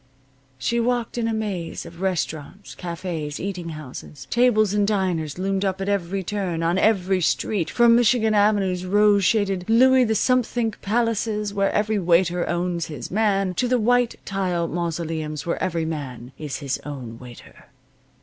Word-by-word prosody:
She 235 - 0
walked 240 0 -1
in 230 - 0
a - - 0
maze 195 -8 -4
of 170 +1 -11
restaurants, 185 0 -3
cafes, 170 -4 -5
eating 180 -3 -4
houses. 150 -2 -9
Tables 215 -4 +3
and 205 -1 +2
diners 180 -7 -1
loomed 195 +1 -1
up 190 -1 -1
at 195 - -3
every 195 -1 -1
turn, 180 -4 -2
on 170 +3 +1
every 190 -3 +2
street, 175 +1 0
from 235 -1 +5
Michigan 235 -2 +3
Avenue's 205 -3 +2
rose 205 +1 +4
shaded 195 -2 +1
Louis 260 +3 +6
the 220 -2 +1
Somethingth 240 -2 +1
palaces, 215 -1 0
where 195 -1 +1
every 215 0 +1
waiter 175 0 +2
owns 175 -1 -1
his 145 -6 -7
man, 195 -2 +1
to 250 +7 0
the 250 +1 +2
white 245 +1 +2
tile 180 -4 -1
mausoleums 165 -2 -3
where 170 - -2
every 170 -3 -1
man 135 -6 -6
is 150 -1 -5
his 140 -3 -3
own 125 -6 -7
waiter. 125 -2 -13
190 Hz, 160 wpm, -23 LUFS, 170-215 Hz, -, Louis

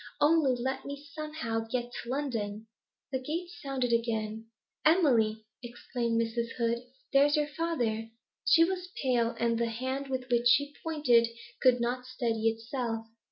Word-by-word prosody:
Only 295 -4 +4
let 260 +2 -2
me 280 +1 -7
somehow 305 -7 -3
get 240 +1 -2
to 235 - -7
London.' 225 -6 -2 0.5
The 260 - 0
gate 335 +6 -3
sounded 260 -4 -1
again. 225 -1 -1 0.4
'Emily,' 235 -10 +3 0.2
exclaimed 235 -1 -2
Mrs. 230 0 -1
Hood, 235 -1 +1 0.3
'there's 285 +1 +5
your 300 - +2
father!' 245 -9 -1 0.3
She 330 - +6
was 365 +1 -1
pale, 240 -3 +2
and 230 0 +1
the 235 0 +1
hand 260 +4 -3
with 260 -1 -3
which 240 0 +4
she 285 +4 +4
pointed 280 -8 +3 0.3
could 250 -1 +5
not 250 +1 -1
steady 230 -3 0
itself. 225 0 -3
245 Hz, 145 wpm, -30 LUFS, 230-280 Hz, 0.5 s, She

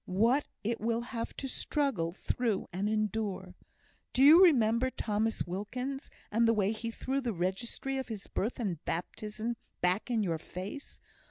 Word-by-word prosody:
what 230 +10 +3 0.2
it 230 +2 -1
will 230 +1 +1
have 235 -1 -4
to 270 - -3
struggle 260 - 0
through 215 +3 -1
and 195 +3 0
endure! 210 -3 -1 0.6
Do 260 - +4
you 320 +6 +10
remember 245 -6 +5
Thomas 220 -2 -1
Wilkins, 250 +9 -4 0.2
and 230 +2 +4
the 230 - +4
way 205 -1 +2
he 225 +1 -4
threw 265 +4 -2
the 240 -4 -1
registry 200 +9 -2
of 265 - -4
his 215 -4 -6
birth 225 +6 -2
and 185 -9 -2
baptism 215 +6 -3 0.2
back 180 +6 +1
in 230 -3 +2
your 165 -4 -1
face? 190 - -7
225 Hz, 160 wpm, -31 LUFS, 195-250 Hz, 0.6 s, you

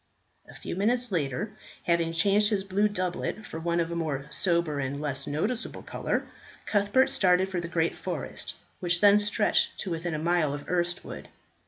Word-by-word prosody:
A - - -13
few - - -6
minutes 235 +5 +2
later, 165 - -1 0.3
having 170 -1 +2
changed 200 +5 +3
his 205 -3 0
blue 200 +2 +2
doublet 185 +2 -3
for 160 - -6
one 170 +1 0
of 170 0 -1
more 155 -5 -2
sober 170 -5 +2
and 135 +1 -3
less 140 -2 -1
noticeable 205 +12 -2
colour, - - -2 0.4
Cuthbert 205 +5 +3
started 185 0 +3
for 180 -2 -2
the 170 - -5
great 170 -1 0
forest, - - -5 0.2
which 175 -1 +1
then 205 +1 +6
stretched 210 +1 +1
to 190 - -4
within 165 0 -2
a - - -1
mile 160 -2 +1
of 145 - -9
Erstwood. 175 -1 -2
175 Hz, 170 wpm, -28 LUFS, 160-205 Hz, 0.4 s, then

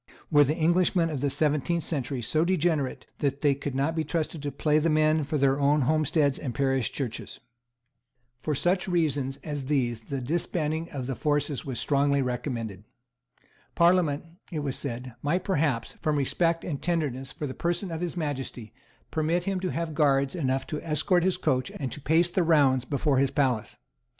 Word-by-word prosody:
Were 145 -1 +7
the 145 +2 0
English 175 +3 +2
of 165 -6 +1
the 140 - +1
seventeenth 150 +4 +1
century 135 -4 -3
so 155 +8 +2
degenerate 165 -6 0
that 140 -1 -1
they 145 -2 +4
could 140 -1 -5
not 140 +4 0
be 160 - 0
trusted 160 0 -2
to 145 0 -3
play 150 +1 +2
the 165 +2 +1
men 155 0 +3
for 150 +2 -1
their 135 0 +2
own 145 +1 +3
homesteads 150 0 +2
and 125 -4 -4
parish 135 -3 +1
churches? 125 -5 -5 1.0
For 150 +3 -2
such 175 +7 +1
reasons 145 -6 0
as 145 -3 -4
these 125 -6 0
the 135 +4 -5
disbanding 160 +3 -1
of 135 -4 -5
the 135 - -2
forces 145 -1 0
was 130 -4 -3
strongly 140 -1 +2
recommended. 120 -5 -4 0.9
Parliament, 170 -4 +3 0.3
it 155 -3 -2
was 140 -3 -2
said, 125 -2 -4
might 170 +6 0
perhaps, 150 - 0
from 155 -2 +1
respect 165 +4 +1
and 145 -5 -4
tenderness 145 -6 -1
for 150 - -5
the 130 - -4
person 175 +4 -2
of 165 0 -4
His 175 0 -3
Majesty, 135 -8 -4 0.4
permit 160 +3 0
him 195 0 -1
to 185 0 -2
have 165 -1 -3
guards 140 -3 +2
enough 135 -6 -1
to 150 -3 -4
escort 175 +3 +2
his 185 0 +2
coach 130 0 0
and 135 -3 -4
to 150 - -7
pace 165 +5 +3
the 185 - +2
rounds 140 -6 +4
before 140 0 +1
his 135 0 +3
palace. 130 -6 0
145 Hz, 180 wpm, -27 LUFS, 135-165 Hz, 1.0 s, Were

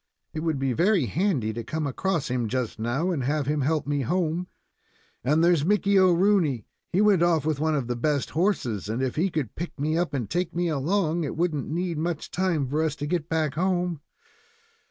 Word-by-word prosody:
It 155 - -3
would 160 -2 -1
be 135 -1 0
very 180 - +3
handy 135 - 0
to 115 +1 -5
come 155 +6 -3
across 165 +2 -1
him 125 -2 0
just 125 -1 -3
now 130 +11 0
and 150 -7 -1
have 145 +2 0
him 150 +1 0
help 155 +2 0
me 145 0 0
home. 175 +5 -1 0.8
And 150 +6 +3
there's 170 -4 +4
Mickey 200 +2 +2
Rooney. 180 - +3 0.3
He 190 - +2
went 205 -5 +4
off 165 -4 +3
on 155 - +2
one 155 +1 +1
of 140 -4 -1
the 120 +1 -2
best 145 +3 0
horses; 130 - 0
and 115 +4 -1
if 130 - -1
he 180 +5 +1
could 155 - -3
pick 170 -2 -6
me 155 +3 +1
up 165 -5 -1
and 120 -6 -2
take 175 -1 -2
me 175 0 0
along, 165 +3 0
it 150 - -4
wouldn't 160 -5 -1
need 170 0 -2
much 165 -1 -3
time 175 -7 0
for 150 +4 0
us 155 -2 0
to 145 - -4
get 165 0 -2
back 155 -3 0
home. 175 -1 0
155 Hz, 210 wpm, -26 LUFS, 135-175 Hz, 0.8 s, there's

